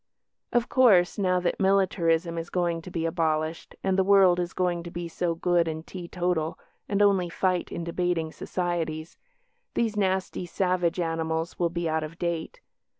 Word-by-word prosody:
Of 240 -1 +2
course, 205 -9 +4
now 185 -2 +2
that 175 - -1
militarism 180 -4 +2
is 165 - -6
going 175 -2 0
to 180 - -9
be 170 -2 -2
abolished, 160 -1 -1
and 190 0 +1
the - - +5
world 190 -2 +5
is 175 0 -2
going 180 -2 0
to 170 - -8
be 170 0 -5
so 170 0 -2
good 175 0 +2
and 160 0 -4
teetotal, 175 -3 -2 0.3
and 205 0 +3
only 190 -3 +3
fight 180 +1 0
in 170 - -4
debating 170 -1 -1
societies, 165 -3 -3 0.6
these 225 -2 0
nasty 190 -2 -1
savage 180 -2 0
animals 165 0 -2
will 170 -1 +2
be 170 0 -2
out 160 0 0
of 155 +2 -7
date. 170 - -3
175 Hz, 165 wpm, -27 LUFS, 165-185 Hz, 0.6 s, the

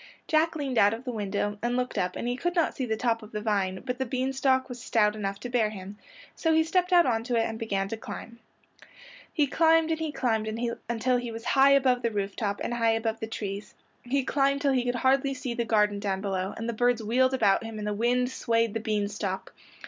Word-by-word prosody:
Jack 320 +1 +2
leaned 275 -5 -1
out 205 +2 +5
of 230 - -11
the 255 - -4
window 205 -1 -2
and 240 +1 0
looked 250 0 -2
up 180 -3 -1
and - - -3
he 245 - 0
could 350 +7 -2
not 335 - +1
see 260 -3 -3
the 220 -1 -1
top 230 -1 0
of 215 - -12
the 210 - -3
vine, 195 -3 -1
but 250 0 -3
the 265 - 0
bean 260 +2 -1
stalk 265 -1 +2
was 245 -2 -8
stout 210 -4 +2
enough 200 -2 -3
to - - -6
bear 240 -3 +1
him, 200 -1 -8 0.4
so 325 -1 +1
he 320 - +5
stepped 360 +3 0
out 350 -1 +6
onto 235 0 0
it 230 - +3
and 225 0 -4
began 195 -4 -1
to 225 - -4
climb. 230 +1 -9 0.9
He 300 - +2
climbed 325 +2 +3
and 320 - 0
he 320 -1 -2
climbed 230 -6 0 0.4
until 240 +2 +1
he 245 -1 -4
was 225 +1 -8
high 275 +2 +5
above 260 -3 +3
the 235 - +1
roof 200 -2 -3
top 205 -3 -2
and - - -2
high 230 -1 +2
above 225 0 -1
the 220 - -4
trees. 205 -2 -6 0.3
He 270 +2 0
climbed 275 +1 +1
till 280 -2 +2
he 250 -2 +1
could 245 0 0
hardly 270 +2 +2
see 255 -1 -4
the 235 -1 -2
garden 210 -2 +2
down 195 -2 -1
below, 190 -1 -2
and 225 - -4
the 235 - -1
birds 245 0 +1
wheeled 255 +4 +2
about 210 -3 +3
him 225 -1 -7
and 210 - -4
the 210 - -1
wind 245 +4 +1
swayed 230 -3 0
the 225 - -1
bean 215 -2 -1
stalk. 200 -2 -4
235 Hz, 245 wpm, -27 LUFS, 210-260 Hz, 0.9 s, out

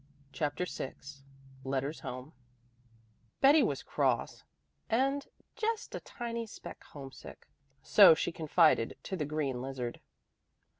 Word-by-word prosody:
CHAPTER 145 +5 -1
VI 135 - -5 0.7
LETTERS 135 +3 -2
HOME 130 +4 -7 1.1
Betty 290 +3 +7
was - - 0
cross - - 0 0.5
and 275 +5 +1 0.3
"just 455 0 -2
a - - -3
tiny 235 -1 -5
speck - - -10
homesick," 135 -2 -11 0.4
so 195 -6 +8
she 175 - -1
confided 155 -6 +3
to 190 - -4
the 155 -5 -2
green 140 -4 -2
lizard. 130 -2 -4
155 Hz, 110 wpm, -32 LUFS, -, 1.1 s, so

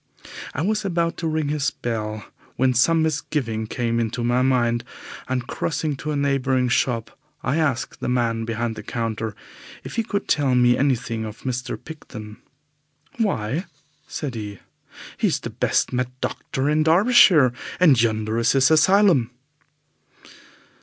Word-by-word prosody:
I 145 - -1
was 215 +3 0
about 170 -3 0
to 165 - -2
ring 155 -2 -1
his 145 -2 0
bell, 110 -2 -4 0.3
when 130 +1 +2
some 160 +7 +3
misgiving 135 -8 -2
came 115 0 -1
into 115 +1 -2
my 120 +1 +2
mind, 120 -3 +2 0.5
and, 125 -2 -1
crossing 155 0 -2
to 155 - -5
a 150 - -1
neighbouring 135 -3 +1
shop, 120 -2 0 0.3
I 125 +5 0
asked 140 -6 -1
the - - -3
man 115 -2 0
behind 115 0 -2
the - - -7
counter 110 -2 -3 0.5
if - - -8
he 230 - +2
could 205 -2 -3
tell 140 -4 +2
me 120 0 +5
anything 125 -4 0
of 110 0 -8
Mr. 125 -1 -3
Picton. 110 -9 -10 0.8
"Why," 160 - -1 0.4
said 145 -5 -4
he, 105 -3 -6 0.6
"he - - +2
is - - 0
the - - -6
best - - 0
mad 125 0 0
doctor 135 +1 -3
in 150 +1 +2
Derbyshire, 165 - +5 0.3
and 150 -10 +6
yonder 110 0 0
is 115 0 +3
his 135 +2 +4
asylum." 160 - +4
130 Hz, 150 wpm, -23 LUFS, 115-155 Hz, 0.8 s, and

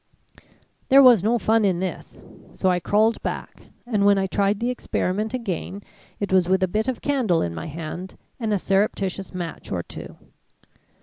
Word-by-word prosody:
"There 275 +1 +8
was 240 -7 +7
no 230 +3 +2
fun 225 0 +2
in 185 -4 +2
this, 185 0 -5 0.4
so 185 - +2
I 180 - +1
crawled 215 +5 +2
back - - -6 0.2
and 215 -4 0
when 200 0 +5
I 195 - +1
tried 200 +1 0
the 240 +2 0
experiment 215 -3 -2
again, 200 -3 -4 0.4
it 200 -2 -2
was 185 -2 +3
with 190 0 +2
a - - +3
bit 215 +6 -1
of 260 -2 -3
candle 250 - +1
in 85 - -3
my 160 - -6
hand, 165 +4 -7 0.2
and 225 -3 -2
a 205 - +2
surreptitious 195 -1 -1
match 175 -3 -6
or 85 -2 -2
two. - - -10
200 Hz, 180 wpm, -23 LUFS, 185-220 Hz, 0.4 s, There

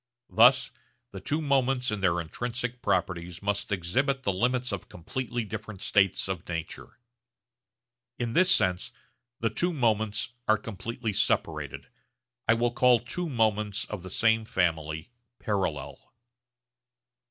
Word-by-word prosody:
Thus 125 +6 +6 0.4
the 95 - -7
two 150 +10 -1
moments 135 -3 +2
in 105 - -2
their 90 -2 +2
intrinsic 120 +8 -4
properties 90 -2 -1
must 100 +1 -1
exhibit 130 - 0
the 100 - +1
limits 125 +5 0
of 100 -3 -5
completely 120 +7 -4
different 110 -1 -7
states 100 -3 +2
of 95 -3 -4
nature. 85 -1 -5 1.2
In 120 -1 -2
this 185 +6 +4
sense 90 - +2 0.5
the 115 -1 +1
two 175 +10 +1
moments 110 -5 +1 0.2
are 110 - +5
completely 110 +1 -4
separated. - - 0 0.6
I 110 - +5
will 120 +1 +1
call 125 0 +5
two 160 +9 -4
moments 105 -4 +1
of 105 -4 -6
the 95 - -8
same 110 +3 +3
family 80 -3 -1 0.3
'parallel.' 85 -10 -3
110 Hz, 130 wpm, -28 LUFS, 95-125 Hz, 1.2 s, Thus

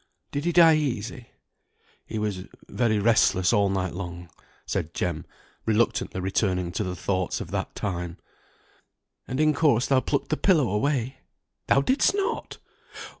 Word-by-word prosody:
Did 145 +2 -3
he 175 - +2
die 165 -2 +6
easy?" 125 -4 -3 0.8
"He - - -5
was 105 -4 -3 0.2
very 115 -3 +1
restless 100 -3 +3
all 100 -3 +3
night 95 -1 -1
long," 85 -2 -7 0.3
said - - -3
Jem, - - -2 0.4
reluctantly 110 -3 +1
returning 90 -1 0
to 100 - -2
the 90 -2 -4
thoughts 95 0 -2
of - - -7
that - - -3
time. 90 -4 -4 1.1
"And 130 - -3
in 155 0 +4
course 140 -6 +3
thou 135 -2 +3
plucked 140 +3 -2
the 155 - 0
pillow 160 - +3
away? 125 +4 -1 0.5
Thou 135 - +4
didst 260 - +2
not! 410 +3 -2
110 Hz, 145 wpm, -25 LUFS, 95-140 Hz, 1.1 s, die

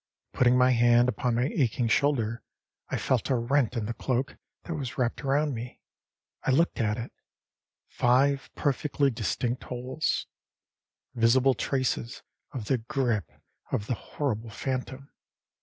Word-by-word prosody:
Putting 125 0 +4
my 125 0 +5
hand 120 0 +5
upon 125 -1 0
my 120 - +2
aching 125 -5 +1
shoulder, 120 -3 +1 0.5
I - - -1
felt 130 0 0
a 130 - +3
rent 125 0 +1
in 110 - -1
the 115 - -3
cloak 130 +2 -2 0.3
that 170 - -5
was 135 -6 -5
wrapped 125 +1 -1
around 145 +2 +1
me. 120 +1 -7 0.6
I - - -2
looked 165 +6 +2
at 105 -1 0
it; 115 0 -6 0.8
five 135 +3 +2
perfectly 145 0 +1
distinct 120 +3 -2
holes 125 +4 -2 0.9
visible 125 +3 +4
traces 130 -3 -2 0.3
of 125 -6 -5
the 130 +3 +1
grip 120 - -1 0.4
of 100 - -1
the 125 - -1
horrible 115 -2 -3
phantom. 130 +4 -4
125 Hz, 140 wpm, -28 LUFS, 115-135 Hz, 0.9 s, my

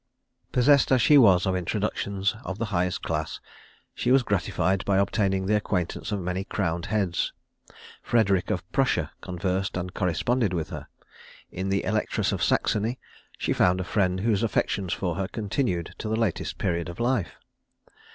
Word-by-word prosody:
Possessed 135 +3 +4
as 130 - +5
she 145 +5 +6
was 95 -7 +6
of 95 -1 +1
introductions 100 +2 -1
of 95 - -5
the 115 - -1
highest 90 +1 0
class, 80 -1 -3 0.5
she - - -2
was 130 0 +5
gratified 95 -2 0
by 100 -1 +1
obtaining 95 -1 +1
the 105 +2 +2
acquaintance 100 -2 -2
of 105 - -1
many 90 +1 -2
crowned 85 -4 -2
heads. 100 -4 0 0.7
Frederic 100 -6 +2
of - - -2
Prussia - - +1
conversed 90 +1 -2
and 90 +1 -4
corresponded 100 +4 0
with 80 -3 -3
her. - - -7 0.6
In 95 +1 -3
the 100 0 +1
Electress 105 +2 0
of - - -2
Saxony 110 +4 +1 0.4
she - - 0
found 90 +1 +3
a - - -1
friend 95 -1 0
whose 110 -2 +1
affection 100 -3 0
for 90 0 -1
her 95 -1 -1
continued 105 - -2
to 110 - -4
the 110 - +1
latest 110 -6 -1
period 85 -3 -1
of 85 - -9
life. 120 -6 0
95 Hz, 160 wpm, -26 LUFS, 90-110 Hz, 0.7 s, she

